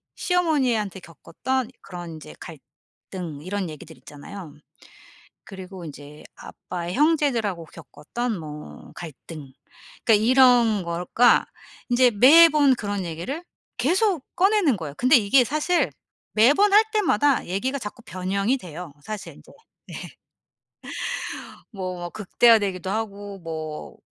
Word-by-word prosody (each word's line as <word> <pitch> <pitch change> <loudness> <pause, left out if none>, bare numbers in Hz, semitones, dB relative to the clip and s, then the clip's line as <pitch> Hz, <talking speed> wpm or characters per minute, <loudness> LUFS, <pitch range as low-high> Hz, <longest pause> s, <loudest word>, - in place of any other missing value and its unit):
시어머니한테 260 - 0
겪었던 225 - -4
그런 175 -3 -8
인제 155 -2 -11
갈등 155 +2 -10
이런 185 0 -3
얘기들 155 +1 -11
있잖아요. 155 +2 -11 0.9
그리고 190 -2 -9
인제 145 0 -11
아빠의 175 0 -7
형제들하고 265 - +1
겪었던 215 +10 -5
뭐 150 -1 -10
갈등. 155 -3 -10 0.5
그러니까 215 -1 +4
이런 245 -5 +5
거가 175 +8 +3 0.4
인제 245 0 +4
매번 290 +4 +7
그런 205 -4 -3
얘기를 175 - -5 0.3
계속 345 - +1
꺼내는 380 - +3
거예요. 155 -4 -6
근데 255 +2 +5
이게 245 +5 +4
사실 310 +6 0 0.4
매번 295 - +4
할 430 +2 +8
때마다 290 - +2
얘기가 255 +10 -2
자꾸 230 +1 -8
변형이 195 +7 -1
돼요 175 - -9
사실 215 -2 -7
인제. - - -18
예. - - -25 2.0
뭐 185 -4 -5
막 175 0 -6
극대화되기도 205 -3 +2
하고 205 -2 -5
뭐 155 -2 -7
205 Hz, 265 characters per minute, -24 LUFS, 175-260 Hz, 2.0 s, 할